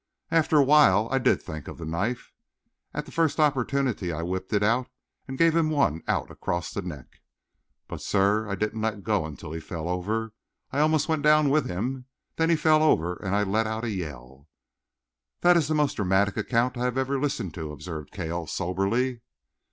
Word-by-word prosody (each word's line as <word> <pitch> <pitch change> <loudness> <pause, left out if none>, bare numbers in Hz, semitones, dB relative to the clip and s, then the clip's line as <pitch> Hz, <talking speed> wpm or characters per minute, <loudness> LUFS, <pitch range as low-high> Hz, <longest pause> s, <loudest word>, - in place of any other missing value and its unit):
After 160 -1 +3
a 145 - +7
while 130 -8 +5
I 135 - +2
did 130 - +3
think 80 -3 -7
of - - -8
the 85 - -7
knife. 100 +10 -3 0.6
At - - -4
the - - -12
first 165 -2 +1
opportunity 135 - +1
I 85 +1 -4
whipped 95 +2 -4
it 105 -1 +2
out 120 +4 +2 0.4
and 130 0 -6
gave 165 +1 +4
him 165 -2 +3
one 135 - +1
out - - -1
across 85 0 -3
the 100 - -2
neck. 75 -9 -9 0.7
But, - - -7
sir, 105 +2 +1
I 100 - -1
didn't 105 +2 -2
let 110 -2 -2
go 105 -8 0
until 75 0 -9
he 80 - -4
fell 80 0 -6
over. 105 +5 -2 0.4
I 140 - -1
almost 155 0 +3
went 160 -2 0
down 150 -1 +4
with 150 +1 +2
him. 125 +8 -3 0.3
Then 160 0 +2
he 170 - +5
fell 155 0 +4
over 90 - +3
and 100 -1 -2
I 105 - +2
let 110 +3 0
out 110 +1 -3
a 115 - -1
yell." 70 -7 -7 0.9
"That 175 0 +6
is 165 -4 +2
the 155 - 0
most 150 -2 +1
dramatic 100 0 +2
account 125 +1 0
I 125 - -1
have 125 0 -1
ever 135 +1 0
listened 135 - -2
to," 80 -3 -6
observed 75 0 -7
Cale 85 -3 -4
soberly. 115 +10 -1
110 Hz, 200 wpm, -26 LUFS, 90-140 Hz, 0.9 s, a